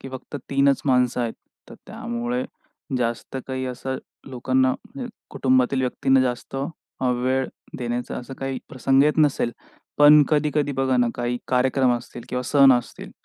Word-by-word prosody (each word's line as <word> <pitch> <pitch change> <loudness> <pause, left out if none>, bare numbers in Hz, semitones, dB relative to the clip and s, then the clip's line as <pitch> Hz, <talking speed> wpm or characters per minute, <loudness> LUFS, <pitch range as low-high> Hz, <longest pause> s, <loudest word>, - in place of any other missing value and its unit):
की 135 - -8
फक्त 130 +2 -7
3च 140 0 +3
माणसं 125 -1 +2
आहेत. 115 -2 -1 0.4
तर - - -11
त्यामुळे 120 +1 -3 0.5
जास्त 120 +2 -3
काही 130 -1 -3
असं 130 +1 -4 0.3
लोकांना, 130 +1 +1
म्हणजे 260 -3 -8 0.2
कुटुंबातील 130 0 +2
व्यक्तींना 130 +1 +2
जास्त 125 +1 -2 0.4
अ, 130 - +1
वेळ 130 +2 0 0.3
देण्याचा 120 0 -3
असा 130 +2 -7
काही 135 -1 -3
प्रसंग 135 +1 +2
येत 150 +1 +2
नसेल. 140 -5 +2 0.5
पण 150 0 +8
कधी-कधी 150 -1 +1
बघा 130 -1 +1
ना, 120 -1 +3
काही 120 0 -2
कार्यक्रम 130 0 +2
असतील 120 0 -9
किंवा 125 0 -2
सण 135 +1 +6
असतील, 120 - -3
130 Hz, 150 wpm, -23 LUFS, 125-135 Hz, 0.5 s, पण